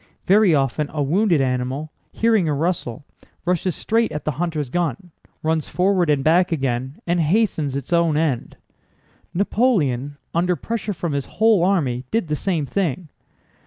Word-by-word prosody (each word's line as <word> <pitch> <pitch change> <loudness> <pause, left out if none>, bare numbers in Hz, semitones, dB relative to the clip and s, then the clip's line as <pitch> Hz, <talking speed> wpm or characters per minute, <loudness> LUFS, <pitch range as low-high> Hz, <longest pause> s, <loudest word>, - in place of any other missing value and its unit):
Very 195 -3 +5
often 140 +2 0
a 150 -2 -1
wounded 170 +1 +2
animal, 130 +4 -2 0.2
hearing 220 -7 +2
a 150 - +1
rustle, 145 -5 -2 0.4
rushes 180 0 0
straight 230 +1 0
at 150 -1 -5
the 155 - +1
hunter's 155 -7 -2
gun, 175 0 -2 0.3
runs 160 -1 0
forward 180 -2 +2
and 145 -2 +2
back 175 +4 +3
again, 130 -2 -2
and 175 0 +1
hastens 160 -5 +1
its 140 +5 -3
own 170 -3 +3
end. 150 -7 -1 0.8
Napoleon, 155 - +1 0.2
under 180 +2 +1
pressure 220 +1 -3
from 170 -3 -3
his 140 -1 -2
whole 220 -4 +4
army, 145 -10 +1
did 225 -8 -1
the 150 - +1
same 165 -2 -1
thing. 170 -1 -2
160 Hz, 155 wpm, -21 LUFS, 140-185 Hz, 0.8 s, Very